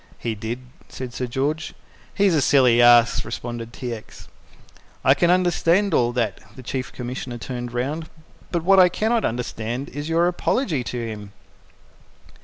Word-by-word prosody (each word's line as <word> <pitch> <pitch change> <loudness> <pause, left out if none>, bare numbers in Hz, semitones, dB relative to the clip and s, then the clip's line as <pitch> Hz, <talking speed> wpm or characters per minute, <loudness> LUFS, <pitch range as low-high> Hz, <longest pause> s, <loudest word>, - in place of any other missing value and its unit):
"He 115 - -3
did," 110 +4 -5 0.3
said 125 -2 -7
Sir 125 - -3
George. 145 +6 -2 0.4
"He's 200 -3 +3
a 155 - +3
silly 125 -4 +5
ass," 120 -1 +6
responded 115 0 -6
T. 125 -1 -5
X. 110 -2 -11 0.8
"I 135 - +7
can 170 +5 +2
understand 180 +2 +2
all 120 -1 +3
that" 115 -5 -1 0.2
the 130 - -11
Chief 130 +2 -4
Commissioner 125 0 -6
turned 120 0 -6
round 145 +7 -3 0.4
"but 170 -2 -1
what 195 +2 +5
I 180 -1 +7
cannot 220 +5 0
understand 120 +2 -3
is 145 +2 -6
your 165 +1 +3
apology 180 - 0
to 120 0 -4
him." 105 -2 -8
130 Hz, 155 wpm, -22 LUFS, 120-165 Hz, 0.8 s, I